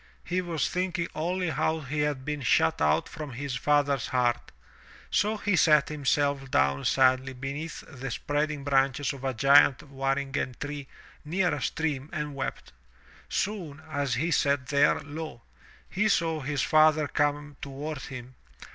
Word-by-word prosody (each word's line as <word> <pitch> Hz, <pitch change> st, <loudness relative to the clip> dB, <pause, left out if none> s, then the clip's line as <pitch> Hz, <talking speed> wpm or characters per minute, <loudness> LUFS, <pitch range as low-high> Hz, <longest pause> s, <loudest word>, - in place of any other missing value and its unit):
He 180 Hz, +1 st, -1 dB
was 170 Hz, -3 st, -1 dB
thinking 180 Hz, -2 st, -1 dB
only 175 Hz, +2 st, -1 dB
how 160 Hz, +2 st, 0 dB
he 150 Hz, +1 st, -4 dB
had 145 Hz, -3 st, -1 dB
been 150 Hz, -1 st, -3 dB
shut 80 Hz, -, +2 dB
out 75 Hz, 0 st, +2 dB
from 150 Hz, -4 st, -7 dB
his 140 Hz, +2 st, -4 dB
father's 140 Hz, +1 st, +1 dB
heart. 120 Hz, -2 st, 0 dB, 0.6 s
So 215 Hz, +1 st, +2 dB
he 205 Hz, -2 st, +1 dB
sat 150 Hz, -4 st, +4 dB
himself 140 Hz, -2 st, 0 dB
down 70 Hz, -, +1 dB
sadly 130 Hz, 0 st, +3 dB
beneath 140 Hz, +5 st, -5 dB
the 135 Hz, 0 st, -7 dB
spread 145 Hz, +5 st, -1 dB
ing 150 Hz, -2 st, -5 dB
branches 135 Hz, 0 st, +1 dB
of 135 Hz, -1 st, -10 dB
a 135 Hz, -2 st, -1 dB
giant 140 Hz, +2 st, +6 dB
waringen 135 Hz, -1 st, -1 dB
tree 145 Hz, -2 st, -5 dB, 0.4 s
near 180 Hz, +4 st, 0 dB
a -, -, -3 dB
stream 150 Hz, -3 st, -2 dB
and 150 Hz, -1 st, -3 dB
wept. 130 Hz, -, -5 dB, 0.6 s
Soon, 180 Hz, -8 st, -3 dB
as 140 Hz, -4 st, 0 dB
he 160 Hz, +7 st, 0 dB
sat 140 Hz, -3 st, +2 dB
there, 145 Hz, +1 st, +4 dB
lo! 145 Hz, -5 st, -7 dB, 0.4 s
he 210 Hz, +3 st, +1 dB
saw 165 Hz, -4 st, +1 dB
his 140 Hz, -1 st, -1 dB
father 155 Hz, -1 st, +4 dB
come 145 Hz, -1 st, -1 dB
toward 140 Hz, +2 st, -5 dB
him. 130 Hz, -2 st, -8 dB
145 Hz, 155 wpm, -28 LUFS, 135-155 Hz, 0.6 s, giant